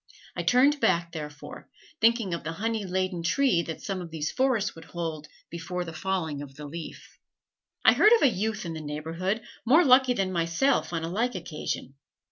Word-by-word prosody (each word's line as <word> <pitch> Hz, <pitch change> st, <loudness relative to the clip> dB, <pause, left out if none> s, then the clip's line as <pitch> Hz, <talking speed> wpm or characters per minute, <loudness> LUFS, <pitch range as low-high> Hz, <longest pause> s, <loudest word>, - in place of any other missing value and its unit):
I -, -, -2 dB
turned 280 Hz, +4 st, +4 dB
back, 170 Hz, -5 st, +2 dB
therefore, 150 Hz, -2 st, -8 dB, 0.3 s
thinking 225 Hz, -4 st, +3 dB
of 170 Hz, -, -4 dB
the 160 Hz, -, -4 dB
honey 220 Hz, +3 st, -2 dB
laden 185 Hz, -1 st, -1 dB
tree 215 Hz, +1 st, +2 dB
that 165 Hz, -2 st, -7 dB
some 195 Hz, -2 st, -3 dB
of 175 Hz, -, -7 dB
these 160 Hz, -1 st, -3 dB
forests 255 Hz, -6 st, +1 dB
would 165 Hz, 0 st, -12 dB
hold 160 Hz, -3 st, -5 dB, 0.2 s
before 175 Hz, +2 st, -4 dB
the 165 Hz, -, -7 dB
falling 160 Hz, -5 st, -2 dB
of 135 Hz, -2 st, -10 dB
the 150 Hz, 0 st, -8 dB
leaf. 160 Hz, +2 st, -9 dB, 0.7 s
I -, -, +8 dB
heard 425 Hz, -, +5 dB
of 465 Hz, -, +4 dB
a -, -, +8 dB
youth 215 Hz, -2 st, -2 dB
in 165 Hz, -, -4 dB
the 160 Hz, -, -6 dB
neighborhood, 165 Hz, +8 st, -3 dB, 0.2 s
more 310 Hz, +9 st, +5 dB
lucky 255 Hz, -1 st, +6 dB
than 195 Hz, -4 st, -1 dB
myself 170 Hz, -, +1 dB
on 165 Hz, -1 st, -2 dB
a -, -, -2 dB
like 225 Hz, +7 st, -1 dB
occasion. 160 Hz, -6 st, -5 dB
180 Hz, 190 wpm, -27 LUFS, 160-225 Hz, 0.7 s, I